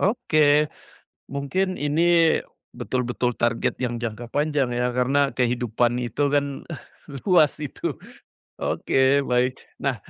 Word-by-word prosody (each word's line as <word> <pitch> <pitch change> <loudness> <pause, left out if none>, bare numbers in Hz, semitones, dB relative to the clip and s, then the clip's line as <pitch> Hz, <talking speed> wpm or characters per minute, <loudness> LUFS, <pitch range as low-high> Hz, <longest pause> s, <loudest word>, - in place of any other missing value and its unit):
oke. 205 -7 +1 0.9
Mungkin 185 +7 -1
ini 145 0 0 0.7
betul-betul 125 -1 -2
target 115 0 0
yang 120 -2 -2
jangka 115 0 -5
panjang, 145 -3 0
ya, 125 0 -1
karena 135 +3 +1
kehidupan 120 -1 0
itu, 125 +3 -2
kan, 140 -1 -1 0.6
luas 165 -7 +4
itu. 150 -3 -4 0.6
Oke, 135 +1 +2
baik. 125 +1 +1 0.2
Nah, 135 -3 0
130 Hz, 105 wpm, -24 LUFS, 120-145 Hz, 0.9 s, luas